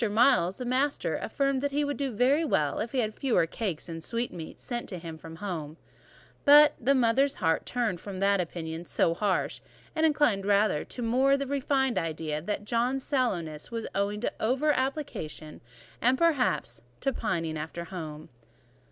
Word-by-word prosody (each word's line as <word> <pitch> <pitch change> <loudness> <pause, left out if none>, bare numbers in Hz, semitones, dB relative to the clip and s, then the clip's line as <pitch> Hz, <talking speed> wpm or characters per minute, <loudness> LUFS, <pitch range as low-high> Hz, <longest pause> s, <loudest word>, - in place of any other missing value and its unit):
Miles, 210 -5 +4
the 250 - -5
master, 265 +4 0
affirmed 275 -2 0
that 285 - 0
he 290 +1 0
would 285 0 -2
do 270 +1 -2
very 260 +8 +3
well 150 - +1
if 225 +2 -3
he 270 - -3
had 220 -3 0
fewer 225 -11 +2
cakes 180 -1 -4
and 165 -1 -6
sweetmeats 230 -8 -4
sent 240 -1 -4
him 170 -4 -6
from 165 +1 -10
home; 165 -5 -5 0.7
but 295 +1 +8
the 275 +4 +3
mother's 260 +3 +3
heart 165 0 0
turned 235 -8 -1
from 195 0 -5
an 200 0 +3
opinion 165 -1 -4
so 165 -1 +1
harsh, 195 +2 -1 0.3
and 315 - +1
inclined 295 -10 +3
rather 205 -6 +3
to 245 - -6
the - - -1
more 260 +4 +3
refined 275 -1 +1
idea 155 -2 -3
that 205 +4 -3
John's 245 +4 0
sallowness 175 - -1
was 230 -1 -4
owing 200 +1 -1
to - - -1
over 265 +7 +2
application 260 - -4 0.4
and, 250 +3 +4
perhaps, 255 - +1 0.2
to 270 0 0
pining 165 -9 -2
after 160 +2 -5
home. 155 -4 -7
225 Hz, 170 wpm, -28 LUFS, 170-270 Hz, 0.7 s, but